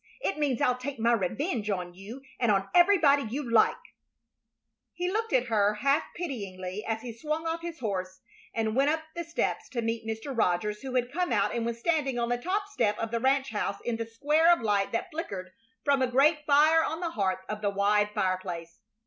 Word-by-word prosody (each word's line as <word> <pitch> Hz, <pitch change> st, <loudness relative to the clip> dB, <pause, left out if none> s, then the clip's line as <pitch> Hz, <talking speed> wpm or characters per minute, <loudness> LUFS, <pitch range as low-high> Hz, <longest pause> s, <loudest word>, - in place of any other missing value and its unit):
It 390 Hz, -9 st, -1 dB
means 280 Hz, -5 st, 0 dB
I'll 250 Hz, 0 st, +2 dB
take 275 Hz, +2 st, -5 dB
my 230 Hz, +1 st, +3 dB
revenge 225 Hz, -, -1 dB
on 180 Hz, -3 st, -2 dB
you 210 Hz, +9 st, -10 dB, 0.2 s
and 235 Hz, -3 st, +3 dB
on 195 Hz, -1 st, +1 dB
everybody 345 Hz, -6 st, +5 dB
you 260 Hz, +3 st, -4 dB
like." 230 Hz, -1 st, +4 dB, 1.2 s
He 360 Hz, +1 st, -2 dB
looked 450 Hz, +2 st, -1 dB
at 255 Hz, -1 st, +3 dB
her 210 Hz, -3 st, +2 dB
half 275 Hz, +7 st, +2 dB
pityingly 200 Hz, -, -5 dB
as 225 Hz, 0 st, -3 dB
he 240 Hz, -2 st, -6 dB
swung 305 Hz, +7 st, -3 dB
off 330 Hz, +1 st, -2 dB
his 335 Hz, -1 st, -6 dB
horse 185 Hz, -4 st, -3 dB, 0.3 s
and 220 Hz, -1 st, -1 dB
went 275 Hz, +2 st, +3 dB
up 315 Hz, +1 st, 0 dB
the 340 Hz, -, -3 dB
steps 335 Hz, 0 st, -2 dB
to 235 Hz, -3 st, -3 dB
meet 230 Hz, 0 st, -2 dB
Mr. 225 Hz, +5 st, -4 dB
Rogers, 210 Hz, 0 st, 0 dB
who 265 Hz, -1 st, -5 dB
had 245 Hz, 0 st, +1 dB
come 360 Hz, -3 st, -1 dB
out 205 Hz, -4 st, +2 dB
and 235 Hz, -1 st, -1 dB
was 235 Hz, 0 st, -3 dB
standing 275 Hz, -2 st, 0 dB
on 235 Hz, 0 st, 0 dB
the 245 Hz, 0 st, 0 dB
top 395 Hz, +8 st, -1 dB
step 210 Hz, -, 0 dB
of 225 Hz, -1 st, -3 dB
the 230 Hz, -, 0 dB
ranch 270 Hz, +1 st, +1 dB
house 205 Hz, -2 st, -2 dB
in 240 Hz, -1 st, -1 dB
the 230 Hz, 0 st, -4 dB
square 300 Hz, +9 st, +3 dB
of 345 Hz, -, +3 dB
light 205 Hz, -3 st, +1 dB
that 230 Hz, -, -2 dB
flickered 195 Hz, -, -5 dB, 0.3 s
from 280 Hz, -1 st, +2 dB
a 260 Hz, -, +3 dB
great 295 Hz, +4 st, +3 dB
fire 310 Hz, +3 st, +5 dB
on 325 Hz, -, -2 dB
the 340 Hz, -2 st, -2 dB
hearth 190 Hz, -5 st, -1 dB
of 215 Hz, 0 st, -5 dB
the 205 Hz, -, +1 dB
wide 205 Hz, +1 st, +2 dB
fireplace. 185 Hz, -4 st, -3 dB
235 Hz, 210 wpm, -28 LUFS, 210-300 Hz, 1.2 s, everybody